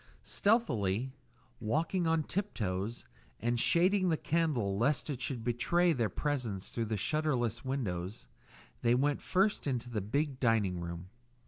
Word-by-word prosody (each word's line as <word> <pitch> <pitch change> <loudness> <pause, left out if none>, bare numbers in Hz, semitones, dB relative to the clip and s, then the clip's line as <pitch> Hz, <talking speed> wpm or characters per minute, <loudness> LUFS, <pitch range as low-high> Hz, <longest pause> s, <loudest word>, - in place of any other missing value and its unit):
Stealthily, 130 - +1 0.5
walking 160 - 0
on 160 -1 +2
tip 200 +6 -3
toe 95 -1 -1 0.5
and 120 +2 0
shading 185 - +4
the 160 - +2
candle 145 -14 0
lest 135 +7 +1
it 130 -3 -5
should 125 -5 -3
betray 170 +9 +2
their 115 -6 0
presence 120 -8 -2
through 115 - -2
the 110 0 -2
shutterless 125 0 0
windows, 105 -7 -3 0.5
they 120 0 +4
went 140 +3 +1
first 195 -2 +1
into 125 -2 -2
the 110 -3 -1
big 135 +6 -1
dining 105 -7 +2
room. 85 +1 -6
125 Hz, 140 wpm, -32 LUFS, 105-155 Hz, 0.5 s, shading